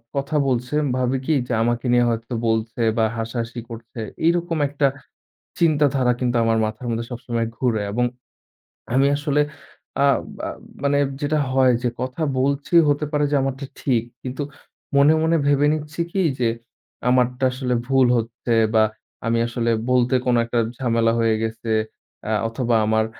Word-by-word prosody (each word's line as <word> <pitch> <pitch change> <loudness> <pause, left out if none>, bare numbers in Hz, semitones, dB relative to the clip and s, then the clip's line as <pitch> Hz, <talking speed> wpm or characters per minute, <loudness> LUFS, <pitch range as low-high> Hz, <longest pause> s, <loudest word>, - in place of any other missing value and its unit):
কথা 140 +2 -1
বলছেন 130 +4 0 0.2
ভাবি 130 +1 +1
কী 160 - +2
যে 125 - -2
আমাকে 120 +1 -1
নিয়ে 120 0 +4
হয়তো 115 +1 -3
বলছে 110 +1 -1 0.2
বা 110 - +4
হাসাহাসি 115 +1 -4
করছে 115 0 -9 0.3
এরকম 170 -1 +1
একটা 140 0 +1 0.7
চিন্তাধারা 145 -6 +3
কিন্তু 125 -1 0
আমার 115 0 +2
মাথার 110 +3 -5
মধ্যে 115 0 -2
সবসময় 120 -2 -2
ঘুরে 115 -5 0
এবং 120 +4 +1 0.9
আমি 135 +2 +4
আসলে 145 0 +1 0.6
আ - - +6 0.4
আব - - -7 0.3
মানে 140 0 +2 0.2
যেটা 150 +1 +1
হয় 130 -1 +4
যে 125 - +2
কথা 130 +5 -3 0.2
বলছি 140 +4 -1 0.2
হতে 145 +1 +1
পারে 150 -1 +1
যে - - +3
আমারটা 135 +1 -3 0.2
ঠিক। 120 -5 +1 0.2
কিন্তু 130 +3 -4 0.5
মনে, 140 +2 +6
মনে, 165 +1 +3
ভেবে 145 0 +4
নিচ্ছি 155 +1 -4
কী 195 - 0 0.2
যে 120 -2 +2 0.6
আমারটা 125 +1 +2
আসলে 125 -1 -2
ভুল 135 -2 +4
হচ্ছে 115 +1 -2 0.2
বা 110 - +6 0.4
আমি 115 0 +2
আসলে 115 0 -1 0.2
বলতে 125 0 +3
কোনো 125 -1 +3
একটা 120 0 -1 0.2
ঝামেলা 115 -3 +2
হয়ে 115 -1 +3
গেছে 110 0 -3 0.5
অ্যা 110 - 0
অথবা 120 0 0
আমার 110 0 +2
125 Hz, 155 wpm, -22 LUFS, 115-140 Hz, 0.9 s, আ